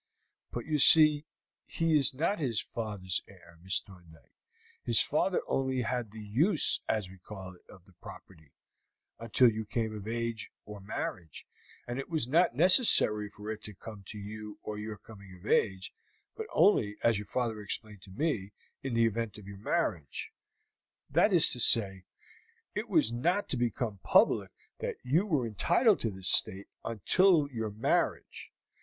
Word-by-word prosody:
"But 120 Hz, -, -6 dB
you 150 Hz, 0 st, -1 dB
see 155 Hz, 0 st, +6 dB, 0.4 s
he 165 Hz, -1 st, 0 dB
is 140 Hz, -3 st, +5 dB
not 170 Hz, +8 st, 0 dB
his 120 Hz, -8 st, 0 dB
father's 105 Hz, -7 st, -3 dB
heir, 85 Hz, -3 st, -18 dB
Miss 95 Hz, +2 st, +1 dB
Thorndyke. 85 Hz, -5 st, -18 dB, 0.5 s
His 115 Hz, -2 st, +2 dB
father 180 Hz, +5 st, +1 dB
only 130 Hz, -1 st, -1 dB
had 120 Hz, -1 st, -3 dB
the 110 Hz, +1 st, -10 dB
use, 145 Hz, -, +2 dB
as 105 Hz, -4 st, 0 dB
we 95 Hz, 0 st, -14 dB
call 95 Hz, -1 st, -9 dB
it, 90 Hz, -, -23 dB
of 95 Hz, -3 st, -16 dB
the 95 Hz, -, -22 dB
property 80 Hz, -6 st, -13 dB, 0.7 s
until 115 Hz, +2 st, +4 dB
you 110 Hz, 0 st, -4 dB
came 110 Hz, 0 st, -3 dB
of 105 Hz, 0 st, -8 dB
age, 115 Hz, -1 st, -3 dB, 0.2 s
or 105 Hz, -1 st, -9 dB
marriage; 95 Hz, -5 st, -6 dB, 0.4 s
it 125 Hz, +3 st, -5 dB
was 160 Hz, -8 st, -1 dB
not 160 Hz, -1 st, +3 dB
necessary 150 Hz, -, +4 dB
for 105 Hz, +1 st, -8 dB
it 110 Hz, 0 st, -7 dB
to 105 Hz, -2 st, -9 dB
come 105 Hz, +1 st, -10 dB
to 105 Hz, -, -8 dB
you 105 Hz, +1 st, -8 dB
on 105 Hz, 0 st, -5 dB
your 105 Hz, 0 st, -6 dB
coming 100 Hz, -2 st, -14 dB
of 90 Hz, +2 st, -17 dB
age, 95 Hz, -4 st, 0 dB, 0.4 s
but 445 Hz, -1 st, -6 dB
only, 105 Hz, -, +3 dB
as 115 Hz, -3 st, +3 dB
your 105 Hz, -, -8 dB
father 115 Hz, -4 st, -2 dB
explained 105 Hz, 0 st, -6 dB
to 95 Hz, -, -15 dB
me, 105 Hz, -, -2 dB, 0.3 s
in 135 Hz, -3 st, -4 dB
the 115 Hz, 0 st, +4 dB
event 115 Hz, -1 st, -2 dB
of 105 Hz, -, -12 dB
your 100 Hz, -1 st, -9 dB
marriage; 95 Hz, -, -2 dB, 0.8 s
that 175 Hz, +8 st, +4 dB
is 175 Hz, -4 st, +7 dB
to 125 Hz, -, +3 dB
say, 95 Hz, -5 st, +3 dB, 0.7 s
it -, -, -4 dB
was 110 Hz, -, +3 dB
not 175 Hz, +12 st, 0 dB
to -, -, -1 dB
become 120 Hz, -3 st, -2 dB
public -, -, +3 dB, 0.3 s
that -, -, -3 dB
you 160 Hz, +11 st, +1 dB
were 150 Hz, -, +1 dB
entitled 175 Hz, -, +2 dB
to 115 Hz, -, -1 dB
the 95 Hz, -2 st, -10 dB
estate 95 Hz, +1 st, +1 dB, 0.2 s
until 150 Hz, -, +3 dB
your 110 Hz, -3 st, -3 dB
marriage. 105 Hz, +2 st, -2 dB
110 Hz, 165 wpm, -30 LUFS, 100-135 Hz, 0.8 s, is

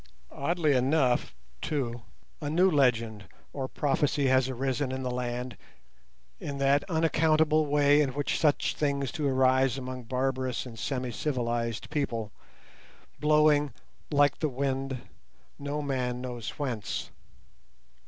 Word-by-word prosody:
Oddly 155 Hz, +1 st, +1 dB
enough, 130 Hz, 0 st, +2 dB, 0.3 s
too, 120 Hz, -5 st, -2 dB, 0.4 s
a 145 Hz, -, -2 dB
new 180 Hz, +5 st, +4 dB
legend 115 Hz, -, +2 dB, 0.3 s
or 135 Hz, -2 st, -3 dB
prophecy 145 Hz, 0 st, 0 dB
has 130 Hz, 0 st, +3 dB
arisen 130 Hz, +1 st, -1 dB
in 130 Hz, 0 st, -3 dB
the 125 Hz, -, -2 dB
land 125 Hz, 0 st, -3 dB, 0.8 s
in 140 Hz, -, -5 dB
that 140 Hz, +1 st, +3 dB
unaccountable 155 Hz, -2 st, +3 dB
way 145 Hz, 0 st, +4 dB
in 135 Hz, -3 st, -1 dB
which 145 Hz, -1 st, -1 dB
such 150 Hz, -3 st, +2 dB
things 140 Hz, -2 st, -1 dB
do 155 Hz, -4 st, -1 dB
arise 130 Hz, -1 st, +3 dB
among 130 Hz, -1 st, -6 dB
barbarous 130 Hz, +1 st, -1 dB
and 115 Hz, -3 st, -9 dB
semi 125 Hz, 0 st, -2 dB
civilized 120 Hz, -3 st, -2 dB
people, 115 Hz, -7 st, -2 dB, 0.9 s
blowing, 150 Hz, -1 st, +4 dB, 0.4 s
like 145 Hz, -1 st, +3 dB
the 155 Hz, -, +1 dB
wind, 135 Hz, -1 st, -2 dB, 0.6 s
no 145 Hz, +1 st, -3 dB
man 125 Hz, -3 st, -1 dB
knows 125 Hz, -3 st, -5 dB
whence. 125 Hz, -8 st, -3 dB
135 Hz, 125 wpm, -29 LUFS, 125-145 Hz, 0.9 s, new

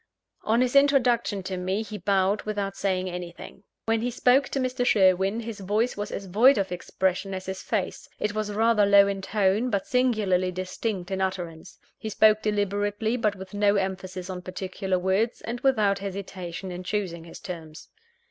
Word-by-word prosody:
On 225 Hz, +3 st, +2 dB
his 255 Hz, +1 st, +1 dB
introduction 245 Hz, -7 st, +3 dB
to 185 Hz, 0 st, -4 dB
me, 190 Hz, +4 st, -1 dB
he 210 Hz, -1 st, -7 dB
bowed 195 Hz, +1 st, +1 dB
without 200 Hz, -2 st, -3 dB
saying 185 Hz, -2 st, -1 dB
anything. 175 Hz, 0 st, -8 dB, 0.2 s
When 225 Hz, 0 st, +1 dB
he 245 Hz, -, 0 dB
spoke 250 Hz, +3 st, +3 dB
to 275 Hz, -, -2 dB
Mr. 255 Hz, -1 st, -1 dB
Sherwin, 195 Hz, 0 st, +3 dB
his 230 Hz, -2 st, -7 dB
voice 210 Hz, +5 st, 0 dB
was 205 Hz, 0 st, -4 dB
as 200 Hz, -, -5 dB
void 230 Hz, +9 st, +5 dB
of 195 Hz, -3 st, -1 dB
expression 190 Hz, +2 st, -1 dB
as 185 Hz, 0 st, -6 dB
his 190 Hz, 0 st, -5 dB
face: 210 Hz, -5 st, -3 dB
it 210 Hz, 0 st, -1 dB
was 215 Hz, -1 st, -2 dB
rather 220 Hz, 0 st, +3 dB
low 200 Hz, 0 st, +6 dB
in 200 Hz, -1 st, -2 dB
tone, 205 Hz, +4 st, +1 dB
but 200 Hz, -4 st, -1 dB
singularly 210 Hz, -8 st, +1 dB
distinct 185 Hz, +1 st, -4 dB
in 190 Hz, 0 st, -1 dB
utterance. 180 Hz, -3 st, -4 dB, 0.2 s
He 220 Hz, -, -5 dB
spoke 215 Hz, 0 st, +4 dB
deliberately, 205 Hz, +2 st, 0 dB
but 215 Hz, -4 st, 0 dB
with 190 Hz, 0 st, -10 dB
no 205 Hz, 0 st, +3 dB
emphasis 190 Hz, -2 st, -3 dB
on 185 Hz, -1 st, -5 dB
particular 185 Hz, +1 st, -3 dB
words, 190 Hz, +6 st, 0 dB
and 240 Hz, +1 st, -5 dB
without 215 Hz, -7 st, +2 dB
hesitation 190 Hz, -2 st, -6 dB
in 180 Hz, +1 st, -6 dB
choosing 180 Hz, -4 st, -3 dB
his 165 Hz, -, -11 dB
terms. 165 Hz, -4 st, -8 dB
200 Hz, 175 wpm, -26 LUFS, 185-220 Hz, 0.2 s, low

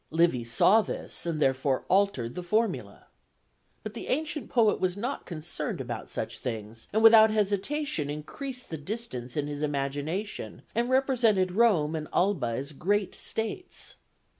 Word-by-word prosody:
Livy 165 Hz, -6 st, +2 dB
saw 185 Hz, -, +5 dB
this, 185 Hz, -, -3 dB
and 165 Hz, -2 st, -1 dB
therefore 135 Hz, -1 st, +1 dB
altered 185 Hz, -12 st, +2 dB
the 180 Hz, -, -5 dB
formula. 215 Hz, +6 st, -1 dB, 0.8 s
But 215 Hz, -, -6 dB
the 235 Hz, -, -7 dB
ancient 305 Hz, +1 st, -2 dB
poet 225 Hz, -4 st, +3 dB
was 185 Hz, 0 st, 0 dB
not 245 Hz, +7 st, -4 dB
concerned 155 Hz, -3 st, -4 dB
about 120 Hz, -3 st, -5 dB
such 110 Hz, +1 st, -4 dB
things, 115 Hz, -2 st, -5 dB
and 220 Hz, +1 st, +1 dB
without 220 Hz, -1 st, +9 dB
hesitation 210 Hz, -, 0 dB
increased 250 Hz, -, -6 dB
the 160 Hz, -, -3 dB
distance 145 Hz, -, -4 dB
in 145 Hz, -, 0 dB
his 145 Hz, 0 st, -5 dB
imagination, 145 Hz, +7 st, -3 dB
and 235 Hz, +2 st, 0 dB
represented 240 Hz, -8 st, +3 dB
Rome 180 Hz, -8 st, +3 dB
and 155 Hz, -1 st, -4 dB
Alba 180 Hz, -9 st, +2 dB
as 130 Hz, +5 st, -3 dB
great 195 Hz, +7 st, 0 dB
states. 225 Hz, -, -4 dB
185 Hz, 145 wpm, -28 LUFS, 145-220 Hz, 0.8 s, without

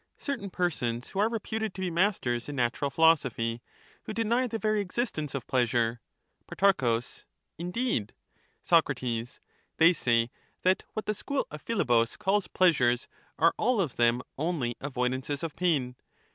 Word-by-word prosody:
Certain 255 Hz, -9 st, -4 dB
persons 130 Hz, -10 st, -2 dB
who 195 Hz, -, -4 dB
are 215 Hz, +2 st, +3 dB
reputed 220 Hz, -1 st, -3 dB
to 190 Hz, -, -5 dB
be 185 Hz, -2 st, -1 dB
masters 165 Hz, -, 0 dB
in 145 Hz, -, -5 dB
PhiUbus, -, -, -7 dB
natural 120 Hz, +3 st, 0 dB
philosophy, 135 Hz, -7 st, +2 dB, 0.4 s
who -, -, -5 dB
deny 235 Hz, +3 st, +1 dB
the 225 Hz, -1 st, -3 dB
very 215 Hz, -1 st, +1 dB
existence 180 Hz, -, -3 dB
of 135 Hz, -, -4 dB
pleasure. 120 Hz, -2 st, +1 dB, 0.5 s
Socratm, -, -, -7 dB, 0.2 s
Pro. 115 Hz, -3 st, +2 dB, 0.6 s
Indeed 180 Hz, -, -1 dB, 0.6 s
I -, -, +8 dB
Protarchus. 120 Hz, -2 st, -3 dB
Soc. -, -, -28 dB, 0.4 s
They 165 Hz, +2 st, +7 dB
say 120 Hz, -6 st, +1 dB, 0.3 s
that 185 Hz, +1 st, +3 dB
what 215 Hz, -, -4 dB
the 215 Hz, -, 0 dB
school 280 Hz, +7 st, -2 dB
of 150 Hz, 0 st, -8 dB
Philebus 120 Hz, -, +1 dB
calls 200 Hz, +1 st, +1 dB
They -, -, -14 dB
are -, -, -21 dB
pleasures 125 Hz, -10 st, +3 dB, 0.3 s
are 165 Hz, +1 st, +4 dB
all 245 Hz, 0 st, +2 dB
of 165 Hz, -9 st, -1 dB
them 120 Hz, +1 st, +3 dB, 0.2 s
only 150 Hz, -7 st, -1 dB
avoidances 130 Hz, +1 st, -2 dB
of 165 Hz, -3 st, -4 dB
pain. 145 Hz, -9 st, 0 dB
155 Hz, 165 wpm, -28 LUFS, 120-200 Hz, 0.6 s, I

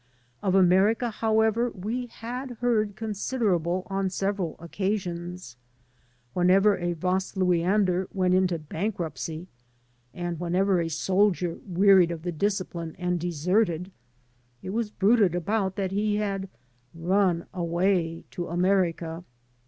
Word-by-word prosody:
Of 190 Hz, -2 st, +1 dB
Amer 190 Hz, +3 st, +5 dB
ica, 240 Hz, 0 st, -3 dB
however, 220 Hz, +2 st, +2 dB
we 230 Hz, +5 st, -4 dB
had 245 Hz, +2 st, -7 dB
heard 215 Hz, -4 st, +1 dB
considerable 200 Hz, -5 st, -1 dB
on 195 Hz, -1 st, -1 dB
several 195 Hz, -2 st, -2 dB
occasions. 175 Hz, -, -4 dB, 0.8 s
Whenever 195 Hz, +3 st, +4 dB
a 175 Hz, -1 st, -2 dB
Vasluiander 185 Hz, +1 st, +1 dB
went 185 Hz, -2 st, +1 dB
into 185 Hz, -2 st, +2 dB
bank 165 Hz, +7 st, -3 dB
ruptcy, 160 Hz, +1 st, -5 dB, 0.7 s
and 175 Hz, 0 st, -4 dB
whenever 180 Hz, +1 st, +1 dB
a 165 Hz, -, -2 dB
soldier 185 Hz, +1 st, +1 dB
wearied 190 Hz, -1 st, +5 dB
of 165 Hz, -2 st, -5 dB
the 175 Hz, -, -2 dB
discipline 175 Hz, -2 st, -2 dB
and 180 Hz, -1 st, -1 dB
deserted, 175 Hz, +2 st, 0 dB, 0.7 s
it 185 Hz, -, -5 dB
was 225 Hz, 0 st, -1 dB
bruited 205 Hz, -3 st, +3 dB
abroad 190 Hz, +2 st, -1 dB
that 195 Hz, -2 st, -2 dB
he 205 Hz, +1 st, 0 dB
had 195 Hz, -2 st, -2 dB, 0.5 s
''run 180 Hz, 0 st, +1 dB
away 170 Hz, -1 st, 0 dB
to 175 Hz, -, -4 dB
America." 175 Hz, -2 st, 0 dB
185 Hz, 120 wpm, -26 LUFS, 175-205 Hz, 0.8 s, Amer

